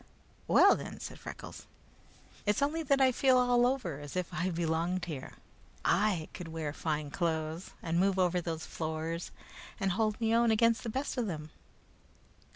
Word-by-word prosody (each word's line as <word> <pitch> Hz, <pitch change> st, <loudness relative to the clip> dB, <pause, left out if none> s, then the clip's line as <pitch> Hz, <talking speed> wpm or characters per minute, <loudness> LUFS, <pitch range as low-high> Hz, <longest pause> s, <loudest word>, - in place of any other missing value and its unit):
"Well -, -, +7 dB
then," -, -, -7 dB
said -, -, -7 dB
Freckles, -, -, -9 dB, 0.8 s
"it's 210 Hz, +6 st, +2 dB
only 310 Hz, +3 st, 0 dB
that 275 Hz, -3 st, +2 dB
I 260 Hz, -1 st, +5 dB
feel 260 Hz, +1 st, +4 dB
all 245 Hz, -1 st, +4 dB
over 235 Hz, -, -2 dB
as 145 Hz, +2 st, -8 dB
if 180 Hz, -1 st, -2 dB
I 180 Hz, +1 st, 0 dB
belonged 170 Hz, +1 st, -1 dB
there. 155 Hz, -7 st, -6 dB, 0.5 s
I 190 Hz, -5 st, +2 dB
could 180 Hz, -, -7 dB
wear 160 Hz, -2 st, -4 dB
fine 150 Hz, -2 st, -2 dB
clothes, 160 Hz, 0 st, -2 dB
and 165 Hz, 0 st, 0 dB
move 195 Hz, +1 st, +2 dB
over 180 Hz, -1 st, +2 dB
those 165 Hz, -2 st, -4 dB
floors, 160 Hz, +1 st, -3 dB, 0.5 s
and 195 Hz, -2 st, +1 dB
hold 215 Hz, +2 st, 0 dB
me 225 Hz, -1 st, +1 dB
own 235 Hz, 0 st, +4 dB
against 230 Hz, +1 st, +3 dB
the 230 Hz, -, -4 dB
best 265 Hz, +4 st, -3 dB
of 235 Hz, -, 0 dB
them." 155 Hz, -4 st, -5 dB
180 Hz, 165 wpm, -31 LUFS, 160-230 Hz, 0.8 s, Well